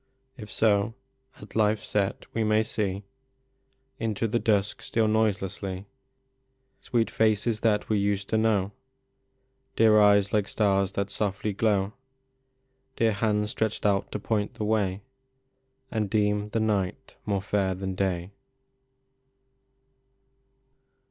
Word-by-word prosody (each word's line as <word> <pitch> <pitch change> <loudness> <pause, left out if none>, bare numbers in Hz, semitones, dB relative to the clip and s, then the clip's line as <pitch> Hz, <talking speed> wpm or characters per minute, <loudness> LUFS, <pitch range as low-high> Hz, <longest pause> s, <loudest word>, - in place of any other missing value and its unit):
If 105 -6 -10
so, 105 +1 +2 0.5
at 105 - -13
life 105 -1 +2
s - - -10
set 100 -2 -1
we 115 - 0
may 110 0 +3
see 100 -2 -2 1.0
Into 115 0 -1
the 115 +2 0
dusk 105 -3 +1
steal 110 -1 0
noiselessly 100 -3 -1 1.0
Sweet 115 -2 0
faces 110 0 +1
that 105 -2 +1
we 105 -2 +1
used 100 0 0
to 110 - +1
know, 105 -3 +1 1.0
Dear 110 -1 +5
eyes 100 -1 +4
like 105 -2 +2
stars 100 -3 +1
that 100 0 -2
softly 105 0 -2
glov/, 100 -1 +1 1.0
Dear 115 -1 +2
hands 105 0 0
stretched 110 -1 -2
out 100 -2 +1
to - - -2
point 105 0 -2
the 105 - -3
way, 105 -3 0 0.9
And 105 -3 -1
deem 105 0 +1
the 110 - -1
night 100 -4 -1
more 100 -2 +1
fair 95 -2 0
than 95 0 -4
day. 95 -1 -2
105 Hz, 125 wpm, -27 LUFS, 100-110 Hz, 1.0 s, Dear